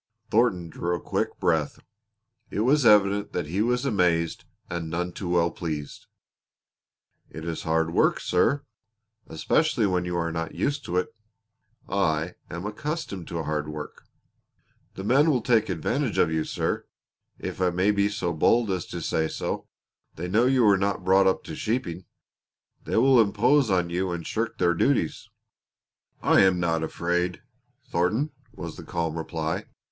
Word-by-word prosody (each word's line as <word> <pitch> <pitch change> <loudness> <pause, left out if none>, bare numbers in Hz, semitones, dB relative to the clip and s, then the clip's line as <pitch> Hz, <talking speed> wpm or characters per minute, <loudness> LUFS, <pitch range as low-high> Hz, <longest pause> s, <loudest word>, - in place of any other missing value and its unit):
Thornton 105 -7 +2
drew 85 +2 -2
a - - -4
quick - - -2
breath. 80 -4 +1 0.7
It 105 - -2
was 130 +2 +4
evident 105 -1 +4
that 90 - -1
he 90 +7 -1
was 125 +3 +1
amazed 90 -8 +1 0.2
and 85 -2 -4
none 90 +2 -2
too 90 +1 -6
well 85 -1 +2
pleased. 75 -4 -6 1.2
"It 80 0 -8
is 85 -1 -3
hard 80 0 0
work, - - +3
sir 140 0 +1 0.6
especially 115 - +1
when 90 -2 +1
you 90 0 -2
are 85 -1 -1
not 80 0 -4
used 145 0 -1
to 90 - -2
it." 90 - -1 0.7
"I 85 -3 0 0.2
am 85 +3 -6
accustomed 110 - -4
to 85 -1 -3
hard 75 -1 -2
work." 75 0 -8 0.9
"The 95 - -6
men 140 +9 +4
will 135 -5 +3
take 115 -3 +3
advantage 115 - -1
of 80 - +3
you, 80 -1 0
sir - - -2 0.5
if - - -6
I 90 - +4
may 90 +4 +2
be 100 0 +2
so 95 -5 -2
bold 110 +7 +3
as 90 -3 -2
to - - -6
say 80 0 0
so. - - -4 0.5
They 85 +3 -4
know 110 +7 +3
you 130 -2 +3
were 100 -3 +5
not 100 -1 -1
brought 95 +1 +5
up 95 - +1
to - - -7
sheeping. 95 -6 -2 0.8
They - - -1
will 130 +1 +6
impose 120 +6 +3
on 90 -3 +1
you 90 +1 -1
and 85 -1 -4
shirk 115 +1 -2
their 85 - +3
duties." 135 +10 0 0.9
"I - - +5
am 95 -2 +4
not 85 -2 +1
afraid, 90 +2 -1 0.4
Thornton," 110 - 0 0.2
was - - -8
the - - -8
calm 85 -2 -2
reply. 80 -1 -3
90 Hz, 160 wpm, -26 LUFS, 85-110 Hz, 1.2 s, will